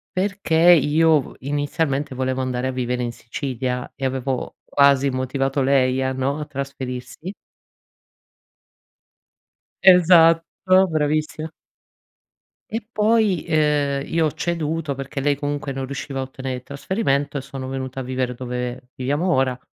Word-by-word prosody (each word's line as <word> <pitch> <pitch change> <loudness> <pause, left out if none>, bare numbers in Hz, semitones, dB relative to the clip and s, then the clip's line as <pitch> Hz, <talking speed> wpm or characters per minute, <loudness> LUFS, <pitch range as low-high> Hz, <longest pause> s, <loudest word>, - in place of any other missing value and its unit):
perché 185 -3 +3
io 155 0 +4
v - - -12
inizialmente 145 0 -1
volevo 130 0 -1
andare 130 0 -2
a - - -1
vivere 125 -1 -2
in 120 - -2
Sicilia 125 +1 -4
e 135 - -9
avevo 130 0 -2
quasi 140 -1 +4
motivato 135 +2 -1
lei 130 -1 +2
a 130 0 0
no, 135 +3 -1
a 150 - -4
trasferirsi 135 +4 -6 2.5
Esatto, 180 +1 +5
bravissima. 155 0 -1 1.2
E 225 0 -4
poi, 215 -5 +2
ehm, 145 -3 +1
io 165 -1 +1
ho 155 - 0
ceduto 165 -3 -2
perché 135 +1 -5
lei 145 0 +1
comunque 145 -1 -3
non 135 0 -4
riusciva 135 0 -5
a - - -1
ottenere 130 0 -5
il 125 - -8
trasferimento 140 - -1
e - - -3
sono 135 -1 -7
venuta 130 0 -4
a - - -5
vivere 130 0 -2
dove 125 0 -5
viviamo 145 +8 -1
ora, 130 -5 +2
140 Hz, 135 wpm, -22 LUFS, 130-155 Hz, 2.5 s, Esatto